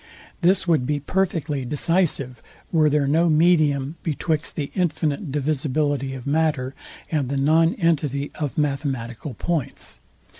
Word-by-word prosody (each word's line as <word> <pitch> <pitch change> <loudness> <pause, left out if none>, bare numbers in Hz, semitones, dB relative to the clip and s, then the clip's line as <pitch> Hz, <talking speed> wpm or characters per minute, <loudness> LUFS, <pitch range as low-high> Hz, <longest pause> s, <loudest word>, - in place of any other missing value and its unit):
This 185 +2 +3
would 155 -7 +2
be 150 -1 0
perfectly 160 -4 -1
decisive, 140 -3 0 0.3
were 155 -3 +4
there 145 -1 +2
no 165 +4 +3
medium 155 -3 +3
betwixt 160 0 -2
the 145 -3 -3
infinite 160 -3 -1
divisibility 145 -1 -1
of 125 - -8
matter, 145 -3 0 0.4
and 145 -5 0
the 140 - -1
non 160 - +3
entity 150 - 0
of 150 -3 -3
mathematical 135 -3 -2
points. 160 +1 -3
150 Hz, 125 wpm, -23 LUFS, 140-165 Hz, 0.4 s, were